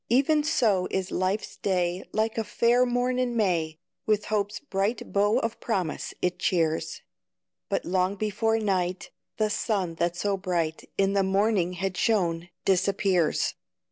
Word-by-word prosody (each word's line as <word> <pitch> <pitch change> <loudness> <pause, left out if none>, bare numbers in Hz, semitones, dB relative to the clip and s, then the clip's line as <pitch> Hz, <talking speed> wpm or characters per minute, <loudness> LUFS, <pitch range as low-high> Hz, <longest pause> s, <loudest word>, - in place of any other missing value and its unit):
Even 285 +5 +3
so 220 - +2
is 190 -1 -2
life's 185 +3 -1
day, 180 -2 0
Like 220 +1 0
a - - 0
fair 240 +4 +3
morn 245 +1 0
in 245 -2 0
May, 165 -7 +1 0.3
With 215 -1 +2
hope's 205 -1 -1
bright 210 -4 -2
bow 205 +3 +3
of 230 -3 -2
promise 185 -9 -2
it 180 0 0
cheers; 165 -3 0 0.7
But - - -1
long 185 +2 +1
before 215 +2 0
night, 185 -4 -1 0.3
The 215 -1 +1
sun 195 -7 -1
that 175 0 +1
so 200 +2 0
bright 170 -4 -2
In 195 0 +2
the 200 - +3
morning 195 -1 +1
had 190 +1 -3
shone, 175 -6 +1 0.2
disappears. 190 -2 +2
195 Hz, 145 wpm, -27 LUFS, 180-220 Hz, 0.7 s, Even